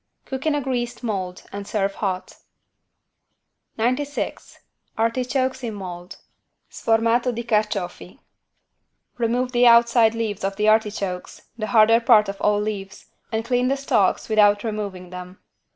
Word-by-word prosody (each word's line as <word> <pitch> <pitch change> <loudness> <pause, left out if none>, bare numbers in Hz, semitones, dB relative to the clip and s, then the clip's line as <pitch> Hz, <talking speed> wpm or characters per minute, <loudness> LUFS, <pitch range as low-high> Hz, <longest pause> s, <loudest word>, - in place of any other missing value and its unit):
Cook 265 +3 -4
in 305 - +2
a 290 - 0
greased 245 -2 -3
mold 190 -5 -3
and 200 0 -7
serve 200 -2 -1
hot. 185 -3 -4 1.4
96 255 +6 -2 0.4
ARTICHOKES 255 +3 0
IN 225 -3 -4
MOLD 180 -2 -8 0.5
(Sformato 230 +2 +1
di 235 0 -5
carciofi) 210 -3 -2 1.0
Remove 245 +2 0
the 245 0 +4
outside 235 -1 +5
leaves 220 -4 -3
of 195 0 -1
the 210 +1 0
artichokes, 205 -4 0
the 215 -2 -4
harder 225 0 +5
part 225 -3 +5
of 195 - -7
all 210 0 +2
leaves, 205 -2 -5 0.2
and 225 0 -2
clean 245 +1 +1
the 275 +1 +1
stalks 215 -8 +1
without 205 -2 +4
removing 200 -5 -5
them. 180 0 -9
220 Hz, 135 wpm, -22 LUFS, 200-240 Hz, 1.4 s, outside